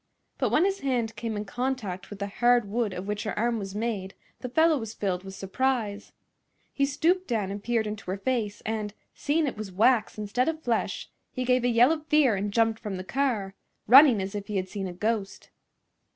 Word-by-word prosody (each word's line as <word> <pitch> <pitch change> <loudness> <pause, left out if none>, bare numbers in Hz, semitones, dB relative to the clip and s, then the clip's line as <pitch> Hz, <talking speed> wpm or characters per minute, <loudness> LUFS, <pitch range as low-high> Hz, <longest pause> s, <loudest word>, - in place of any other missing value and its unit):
But - - +1
when 330 - +3
his 390 0 0
hand 240 -5 -1
came 225 -1 -4
in 205 - -4
contact 235 -5 -3
with 205 - -8
the 200 - -3
hard 240 +2 +2
wood 220 0 -1
of 185 +1 -6
which 210 0 -2
her 215 - -4
arm 230 +1 +1
was 195 -1 -6
made 210 -4 -3 0.2
the 250 - -5
fellow 320 +3 +3
was 225 -1 -6
filled 185 -3 -2
with 190 0 -9
surprise. 210 0 -2 0.6
He 275 0 +1
stooped 355 +6 +1
down 210 -5 -1
and 200 0 -6
peered 230 -1 +1
into 210 -3 -6
her 190 - -1
face, 215 -2 -2
and, 215 -2 -3 0.2
seeing 300 +2 0
it 270 - -3
was 210 -3 -6
wax 215 +4 +2
instead 215 +6 0
of 315 -1 -5
flesh, 235 -2 -1 0.2
he 255 -1 -3
gave 250 0 +2
a - - +3
yell 240 +4 +5
of 310 -1 -3
fear 290 -7 +4
and 200 +1 -2
jumped 225 0 +2
from 205 -4 -5
the 185 - -5
car, 225 -4 -1 0.3
running 250 -4 +8
as 195 +2 -5
if 205 -1 -5
he 210 - -4
had 190 -1 -1
seen 195 -1 -4
a 180 - -6
ghost. 210 +1 -3
225 Hz, 215 wpm, -27 LUFS, 200-255 Hz, 0.6 s, running